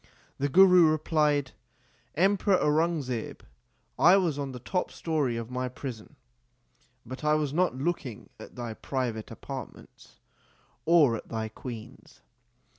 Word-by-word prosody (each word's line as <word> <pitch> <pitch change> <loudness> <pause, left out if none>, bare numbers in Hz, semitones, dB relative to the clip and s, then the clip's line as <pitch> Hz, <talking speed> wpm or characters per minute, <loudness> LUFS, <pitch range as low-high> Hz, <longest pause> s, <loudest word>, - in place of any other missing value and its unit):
The 140 +1 0
Guru 180 0 +7
replied, 150 -3 +1 0.6
Em 195 +5 +3
peror 195 -1 +2
Aurangzeb, 150 -6 -1 0.6
I 175 +4 +7
was 165 -7 0
on 140 -1 -3
the 125 - -7
top 180 +9 -2
story 145 -8 -1
of 115 +1 -6
my 125 0 -2
prison 125 +1 -8 0.9
but 130 +5 -8
I 150 0 +3
was 150 -2 -1
not 180 -3 +1
looking 135 -5 -4
at - - -12
thy 120 -2 -5
private 120 -3 -4
apart - - -7
ments - - -18 0.7
or 155 -8 +5
at - - -12
thy 110 -1 -3
queens. 120 +2 -10
140 Hz, 135 wpm, -28 LUFS, 125-165 Hz, 0.9 s, Guru